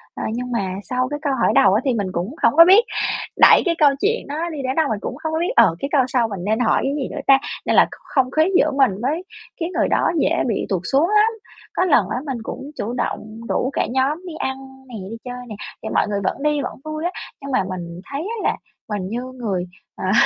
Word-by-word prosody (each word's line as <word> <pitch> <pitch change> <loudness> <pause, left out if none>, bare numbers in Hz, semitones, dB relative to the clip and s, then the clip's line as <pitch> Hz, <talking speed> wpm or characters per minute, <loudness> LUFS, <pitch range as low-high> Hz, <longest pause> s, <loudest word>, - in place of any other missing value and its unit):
Ờ, - - -5
nhưng 250 +1 -4
mà 190 -5 -1
sau 255 0 -1
cái 295 0 -4
câu 285 -3 0
hỏi - - +4
đầu 195 -1 +6
á 215 - +2
thì 260 - +2
mình 205 -4 -1
cũng 185 - -3
hổng - - +4
có 335 - +11
biết 395 +6 +7 0.6
đẩy - - +8
cái 335 -1 +1
câu 295 -2 +6
chuyện 450 -1 0
đó 320 +4 -3
đi 305 - -6
đến 260 +1 -1
đâu. 320 -3 +2
Mình 215 -2 -1
cũng 250 - -4
hông 315 0 -2
có 320 - 0
biết: 345 - -1
"Ờ, 220 -8 +5
cái 275 - -3
câu 280 -3 +4
sau 245 -3 +1
mình 195 -4 -6
nên 220 +3 +1
hỏi 240 - +3
cái 275 +1 0
gì 275 -3 -2
nữa 295 - -5
ta?" 270 -1 +8 0.3
nên - - +1
là - - +7
kh - - -11 0.2
không 260 -1 +3
khí 315 - +3
giữa - - +3
mình 270 -5 +3
với 310 +8 -1 0.4
cái 330 - -1
người - - +3
đó - - +2
dễ 330 +3 +2
bị 220 - -1
tụt 185 -3 0
xuống 295 +7 +3
lắm. 425 +1 +4 0.4
Có 370 - +1
lần 235 - +3
á, 240 - -2
mình 265 -4 -3
cũng 275 +5 -7
chủ 230 +4 -3
động 225 -2 -4
rủ 255 - 0
cả - - 0
nhóm 270 +5 +1
đi 335 - -6
ăn 265 0 -2 0.3
nè, 240 - -10 0.2
đi - - -5
chơi 250 0 -7
nè, 210 - -6 0.3
thì - - -4
mọi - - +1
người 200 -1 -2
vẫn 275 - -2
đi, 300 -1 +1
vẫn - - -5
vui 310 +2 -4
á, 355 - 0 0.3
nhưng 280 0 -6
mà 255 - +2
mình 175 -1 -6
thấy 280 +2 -3
á 435 +4 -2
là - - -2 0.3
mình 195 -3 -3
như 240 +3 -3
người, 225 -9 -3 0.3
à, 185 - -2
260 Hz, 265 wpm, -21 LUFS, 220-305 Hz, 0.6 s, có